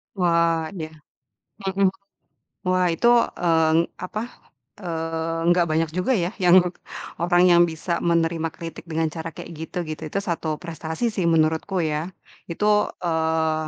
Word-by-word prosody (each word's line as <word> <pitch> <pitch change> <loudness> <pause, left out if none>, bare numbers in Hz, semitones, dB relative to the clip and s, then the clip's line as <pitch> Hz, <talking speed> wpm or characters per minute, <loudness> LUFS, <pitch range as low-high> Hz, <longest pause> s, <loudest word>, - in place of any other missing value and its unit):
Wah 170 -3 +2
yah, 155 0 -6 0.7
hmm. 195 0 +2 0.8
Wah 185 -1 +2
itu, 235 +8 +2 0.3
eee, 160 -2 +2 0.3
apa, 210 +4 -4 0.6
eee, 165 -2 -3
nggak 175 0 +4
banyak 160 0 +1
juga 185 +9 +1
ya, 185 -3 0
yang, 175 0 +7
e - - -2 0.5
orang 175 0 +4
yang 175 -1 +6
bisa 170 +1 -2
menerima 165 -1 +1
kritik 165 0 -8
dengan 160 0 +1
cara 160 +1 -6
kayak 170 - -10
gitu, 160 +3 -7
gitu 155 0 -6
itu 200 - 0
satu 160 -5 -3
prestasi 160 +6 -4
sih 190 - 0
menurutku 160 +3 +1
ya. 160 +2 -1 0.4
Itu, 210 +4 +2
eee, 160 -2 0
165 Hz, 140 wpm, -23 LUFS, 160-180 Hz, 0.8 s, yang